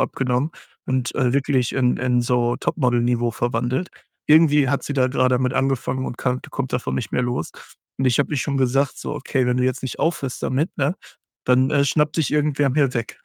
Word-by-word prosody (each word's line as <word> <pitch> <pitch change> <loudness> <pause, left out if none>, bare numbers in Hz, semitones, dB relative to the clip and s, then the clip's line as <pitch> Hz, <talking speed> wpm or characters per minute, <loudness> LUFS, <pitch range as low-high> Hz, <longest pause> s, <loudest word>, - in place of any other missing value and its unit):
abgenommen 130 +3 0 0.4
und, 130 -1 -1
äh, 125 -2 +1
wirklich 130 -3 +1
in 125 -2 +2
in 125 -1 +1
so 120 0 +1
Top-Model-Niveau 120 -3 0
verwandelt. 120 +7 -2 0.4
Irgendwie 150 -3 +5
hat 140 +1 0
sie 145 - -3
da 130 -2 +3
grade 130 -1 +2
damit 130 0 0
angefangen 130 -1 -1
und 120 - -5
kann 125 0 -1
kommt 135 -2 -4
davon 125 - -2
nicht 120 - -4
mehr 125 - +1
los 125 0 -2 0.5
und 135 - 0
ich 120 - +2
habe 145 - 0
ihr 145 - 0
schon 140 0 -1
gesagt: 135 +1 +1
„So, - - -5
okay, 130 -1 -1
wenn 125 0 +1
du 125 - +2
jetzt 130 -1 -1
nicht 130 -3 -5
aufhörst 140 -6 -2
damit, 145 +8 -1
ne, 145 +6 +1 0.5
dann, 130 +2 +3
äh, 140 - +3
schnappt 150 +2 +1
dich 155 -5 +1
irgendwer 145 -2 +1
mir 140 -2 +1
weg.” 115 -1 -4
130 Hz, 205 wpm, -22 LUFS, 125-140 Hz, 0.5 s, Irgendwie